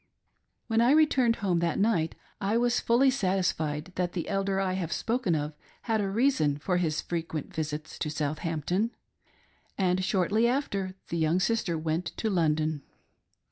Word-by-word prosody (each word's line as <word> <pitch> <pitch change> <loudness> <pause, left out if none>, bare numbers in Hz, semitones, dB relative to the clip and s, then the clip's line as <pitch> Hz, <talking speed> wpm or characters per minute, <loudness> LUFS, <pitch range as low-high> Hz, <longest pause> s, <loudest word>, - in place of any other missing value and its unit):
When 225 -1 +2
I 245 +4 +5
returned 270 -7 +4
home 185 -6 0
that 170 -1 0
night 195 -7 +1 0.3
I 205 +3 +1
was 240 0 +2
fully 260 +3 +4
satisfied 185 - -1
that 180 -1 -1
the 170 - -3
Elder 195 0 0
I 190 -1 0
have 180 -3 -3
spoken 230 -7 0
of 150 0 -2 0.3
had 225 -2 +1
a 195 - -1
reason 195 - +2
for 180 +4 0
his 160 -3 0
frequent 165 0 -4
visits. 155 -2 -4
to 150 - -1
Southampton, 155 - -1 0.8
and 185 -1 +1
shortly 205 +5 +2
after, 200 -8 -1
the 170 - -2
young 160 +3 +2
sister 190 -4 0
went 160 +2 -2
to 220 - -1
London. 155 -4 +1
185 Hz, 155 wpm, -28 LUFS, 160-225 Hz, 0.8 s, I